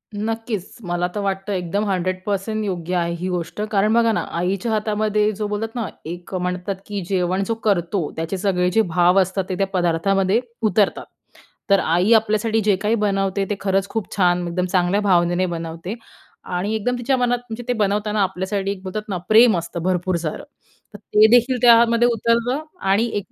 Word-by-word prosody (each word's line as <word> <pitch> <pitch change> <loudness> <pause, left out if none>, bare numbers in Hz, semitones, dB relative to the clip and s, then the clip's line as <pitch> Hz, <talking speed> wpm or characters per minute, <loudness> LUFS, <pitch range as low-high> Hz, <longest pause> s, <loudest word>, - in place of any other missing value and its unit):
नक्कीच, 220 -2 -4
मला 175 -1 -1
तर - - -1
वाटतं, 195 0 -2
एकदम 190 +3 -1
100% 195 +3 -2
योग्य 180 -3 -3
आहे 170 -1 0
ही 180 - -3
गोष्ट, 180 +3 -4
कारण 210 +1 +2
बघा 230 0 +4
ना, - - 0 0.2
आईच्या 190 +5 -1
हातामध्ये 215 0 +1
जो 210 +1 -3
बोलतात 220 +2 -4
ना, 235 -4 -2 0.2
एक 175 +3 -8
म्हणतात 180 +1 -2
की 205 -1 -4
जेवण 185 0 0
जो 230 - 0
करतो, 175 -4 0
त्याचे 165 +4 -3
सगळे 180 -2 +1
जे 225 - +3
भाव 180 +2 +4
असतात, 190 +1 -1
ते 185 - -1
त्या 195 - +1
पदार्थामध्ये 190 +4 +2 0.3
उतरतात. 210 -2 +1 0.7
तर 200 - +6
आई 175 +7 +2
आपल्यासाठी 220 0 +2
जे 205 -1 +4
काही 215 +2 +2
बनवते 195 -2 0
ते 205 - 0
खरंच 195 0 0
खूप 225 -3 -4
छान, 180 -2 +2
एकदम 180 +1 -1
चांगल्या 185 +2 +2
भावनेने 180 -2 +2
बनवते 165 +3 -5 0.5
आणि 185 +4 -2
एकदम 245 +3 -1
तिच्या 255 +2 +1
मनात, 245 -1 +1
म्हणजे 225 +2 -6
ते - - +2
बनवताना 210 +1 0
आपल्यासाठी, 190 +1 -2
एक 195 -2 -5
बोलतात 210 +3 -5
ना, 190 -3 -2
प्रेम 220 -1 +6
असतं 170 0 -5
भरपूर 185 0 0
सारं 155 - -4 0.5
तर - - -8
ते 210 +1 +4
देखील 250 +2 +2
त्यामध्ये 235 0 +6
उतरलं 235 +5 0 0.3
आणि 205 +4 +3
ए - - +1
195 Hz, 180 wpm, -21 LUFS, 180-215 Hz, 0.7 s, तर